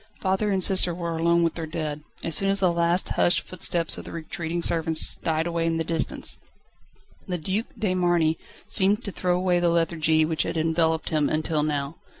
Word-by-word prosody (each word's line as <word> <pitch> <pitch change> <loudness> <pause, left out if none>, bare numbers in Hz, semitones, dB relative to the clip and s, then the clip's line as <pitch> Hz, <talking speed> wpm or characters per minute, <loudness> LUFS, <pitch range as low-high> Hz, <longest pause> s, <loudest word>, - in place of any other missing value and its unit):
Father 190 +2 0
and 190 -2 +1
sister 180 -2 +3
were 170 -1 -4
alone 170 +1 +2
with 165 - +1
their 165 -2 -5
dead. 155 -2 -4 0.2
As 165 - -2
soon 195 +5 +3
as 195 0 +2
the 185 -2 +3
last 170 +2 +1
hushed 175 - +2
footsteps 170 -2 +2
of - - -8
the - - -9
retreating 165 +1 -4
servants 160 -1 +1
died 160 0 -1
away 170 -1 -1
in 165 0 0
the 165 - -1
distance, 165 -1 -2 0.9
the 180 - -2
Duc 190 +8 -3
de 205 -4 0
Marny 175 -3 +1 0.3
seemed 200 +1 +2
to 200 - -5
throw 180 -1 0
away 180 -1 +1
the 175 0 +2
lethargy 160 -2 +2
which 160 0 -1
had - - -2
enveloped 160 0 0
him 150 -2 +1
until 155 0 0
now. 145 0 -2
170 Hz, 195 wpm, -25 LUFS, 160-180 Hz, 0.9 s, sister